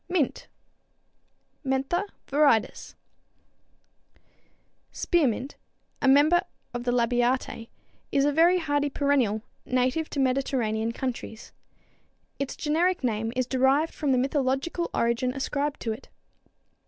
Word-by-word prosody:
=Mint= 345 -7 -1 1.2
(Mentha 270 +8 0 0.2
viridis, 280 -6 +1
Linn.) - - -42 0.7
Spearmint, 275 - 0 0.5
a 275 - +2
member 295 +6 +5 0.3
of 240 0 -4
the 245 - +1
Labiatæ, 245 0 0 0.4
is 275 0 +3
a 290 - +3
very 335 +5 +5
hardy 290 -3 0
perennial, 265 -7 +1 0.2
native 255 +5 0
to 285 - -4
Mediterranean 255 -4 0
countries. 235 -2 -5 0.9
Its 275 -1 -3
generic 335 +3 0
name 225 -2 -1
is 255 0 +1
derived 265 +5 +2
from 290 -3 -1
the 255 - +3
mythological 270 +5 0
origin 235 +2 0
ascribed 285 +2 -2
to 225 - -2
it. 220 +5 -8
270 Hz, 110 wpm, -26 LUFS, 245-290 Hz, 1.2 s, member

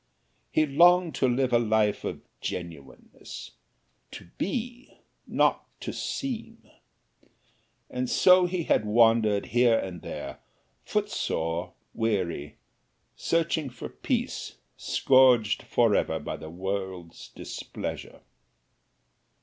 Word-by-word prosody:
He 155 - +3
longed 175 +4 +5
to 130 - +2
live 125 0 +1
a 120 - +6
life 110 -2 +1
of - - -4 0.2
genuineness 80 -7 -8 0.6
to - - -10
be, 245 +5 -4 0.3
not - - +1
to - - -4
seem. 230 -4 -5 1.2
And 125 0 -3
so 180 -1 +6
he 175 -1 -2
had 110 - +2
wandered 110 -1 +3
here 120 -1 +3
and 90 -5 -5
there, - - -7 0.4
footsore, 80 +2 -2 0.2
weary, 95 -9 -2 0.6
searching 165 -3 0
for 120 -1 -8
peace, - - -3 0.2
scourged 125 -6 +4
forever 105 -8 +2
by 75 - -5
the 80 - -9
world's 95 -1 -5
displeasure. - - -7
115 Hz, 100 wpm, -27 LUFS, 95-155 Hz, 1.2 s, a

